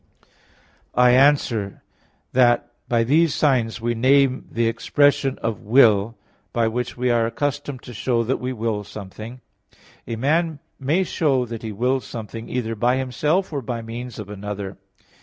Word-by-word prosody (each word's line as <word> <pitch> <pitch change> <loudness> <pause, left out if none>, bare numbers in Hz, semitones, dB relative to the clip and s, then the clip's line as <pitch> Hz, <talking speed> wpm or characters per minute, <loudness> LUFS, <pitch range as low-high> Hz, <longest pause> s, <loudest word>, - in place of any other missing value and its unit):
I 125 0 +6
answer 125 -6 +2 0.5
that, 120 -2 +3 0.2
By 115 -1 +3
these 155 +6 +3
signs 125 -7 +1
we 120 +1 -1
name 130 +2 +3
the 115 0 +1
expression 135 +4 +2
of 115 -2 -1
will 115 -2 +4 0.3
by 115 -1 +1
which 125 +3 -3
we 125 0 +1
are 115 -1 +2
accustomed 145 +1 -3
to 125 - -9
show 120 +1 0
that 125 +4 0
we 125 +1 -3
will 110 -3 -2
something. 110 +4 -9 0.7
A 115 - -3
man 155 +6 +1 0.2
may 150 +8 +1
show 140 -8 +1
that 115 -1 -7
he 110 - -5
wills 125 +5 -1
something, 115 0 -7
either 115 -3 -2
by 120 +4 +1
himself 150 +8 0
or 140 - -2
by 115 -1 -4
means 120 +1 -7
of 105 - -7
another. 100 -1 -6
120 Hz, 155 wpm, -22 LUFS, 115-135 Hz, 0.7 s, I